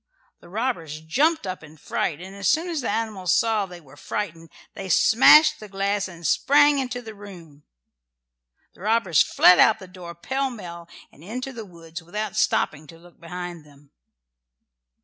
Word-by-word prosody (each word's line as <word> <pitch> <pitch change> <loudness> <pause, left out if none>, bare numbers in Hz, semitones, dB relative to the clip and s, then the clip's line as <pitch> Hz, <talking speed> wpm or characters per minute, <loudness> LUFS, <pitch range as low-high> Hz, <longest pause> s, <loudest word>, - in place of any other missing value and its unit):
The - - -17
robbers 180 - -3
jumped 285 - +1
up 185 -3 -6
in 155 0 -14
a - - -20
fright, 150 0 -3
and 190 +2 -10
as 200 -1 -3
soon 335 +3 +1
as 325 -4 -2
the 245 - -3
animals 210 -6 -1
saw 220 -3 +1
they 180 -1 -11
were 145 -4 -18
frightened 165 0 -5 0.2
they 195 -1 -8
smashed 300 - +6
the 215 - -11
glass 195 +1 -1
and 170 -2 -12
sprang 290 - +4
into 250 -2 -4
the 220 -1 -9
room. 175 -8 -14 1.1
The - - -20
robbers 210 -5 +2
fled 180 - +5
out 220 - +6
of - - -22
the 190 - -11
door 180 -2 -10
pell 265 - -2
mell 170 -8 -10 0.2
and 150 - -19
into 255 +7 -6
the 225 -3 -8
woods 165 -3 -11
without 210 +4 -5
stopping 155 -8 0
to 165 - -14
look 175 +1 -20
behind 175 -1 -7
them. 145 -1 -21
190 Hz, 180 wpm, -23 LUFS, 170-225 Hz, 1.1 s, smashed